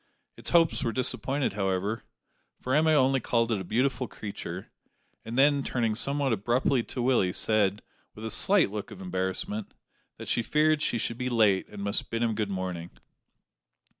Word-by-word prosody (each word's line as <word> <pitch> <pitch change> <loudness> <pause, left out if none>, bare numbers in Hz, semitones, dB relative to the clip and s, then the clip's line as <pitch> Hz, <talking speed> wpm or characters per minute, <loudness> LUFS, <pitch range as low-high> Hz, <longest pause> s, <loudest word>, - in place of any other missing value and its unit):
Its - - -3
hopes 165 -5 +3
were 115 - 0
disappointed, 130 +1 0
however, 100 +2 -1 0.6
for 130 - -3
Emma 155 +2 +4
only 135 -2 +3
called 115 -1 0
it 105 -4 0
a - - -5
beautiful 125 +6 0
creature; 105 -2 -7 0.5
and 115 +2 -6
then, 140 +1 +4
turning 115 -4 0
somewhat 140 +3 +1
abruptly 120 +5 +1
to 120 +1 -5
Willie, 120 -8 +2
said, 105 0 +1 0.3
with 110 - -8
a 110 - -2
slight 195 - +4
look 105 -1 -5
of 105 -4 -11
embarrassment, 95 +3 -3 0.4
that - - -9
she 120 - +1
feared 155 +4 +2
she 135 - 0
should 115 +1 -3
be 125 0 -1
late 105 -5 +3
and 105 -1 -8
must 100 0 0
bid 115 +1 -1
him 115 -1 +1
good 105 -1 -2
morning. 90 -3 -4
115 Hz, 170 wpm, -28 LUFS, 100-130 Hz, 0.6 s, Emma